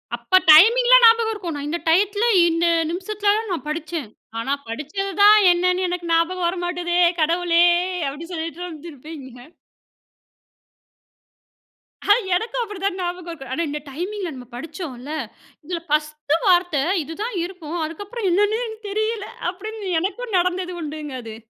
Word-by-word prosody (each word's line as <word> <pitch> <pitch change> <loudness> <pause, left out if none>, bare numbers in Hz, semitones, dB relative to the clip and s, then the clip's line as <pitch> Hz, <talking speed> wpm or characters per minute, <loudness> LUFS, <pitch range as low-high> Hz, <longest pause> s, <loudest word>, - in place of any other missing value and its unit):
அப்ப 375 - +2
டைமிங்லா 485 +9 +7
ஞாபகம் 455 -1 +6
இருக்கும். 345 -7 -5
நான் 290 0 -5
இந்த 340 +2 -2
டயத்துல, 405 +6 +2 0.2
இந்த 330 +1 0 0.3
நிமிஷத்துல 405 +3 0
தான் 440 -3 -4
நான் 320 - -5
படிச்சேன். 310 -5 -4 0.3
ஆனா, 270 +5 -1
படிச்சது 305 - -4
தான் 420 +1 +9 0.2
என்னன்னு 365 +1 +1
எனக்கு 350 -1 -4
ஞாபகம் 345 +2 +1
வர 355 - -1
மாட்டுதே 350 0 -2 0.2
கடவுளே! 340 +1 +3 0.5
அப்டி 295 +4 -8
சொல்லிட்டு 330 +1 -5
வந்துருப்பீங்க. 300 -5 -10 3.0
எனக்கும் 470 +5 -2
அப்படிதான் 395 -3 -3
ஞாபகம் 355 0 -4
இருக்கும். 270 -5 -9
ஆனா, 335 - -1
இந்த 300 +1 -4
டைமிங்ல 360 +4 -5
நம்ம 250 -2 -11
படிச்சோம்ல, 290 -2 -7 0.5
"இதுல 345 0 -3
பர்ஸ்ட் 300 -1 -1
வார்த்த 355 -4 +3 0.3
இதுதான் 400 - -5
இருக்கும். 350 -3 -7
அதுக்கப்புறம் 405 +6 -5
என்னன்னே 415 +5 +2
எனக்கு 440 -1 -9
தெரியல." 435 0 -2 0.2
அப்படின்னு 405 +2 -7
எனக்கும் 420 +4 -3
நடந்தது 365 0 -1
உண்டுங்க 300 -2 -6
அது. 225 -1 -9
350 Hz, 130 wpm, -21 LUFS, 310-405 Hz, 3.0 s, தான்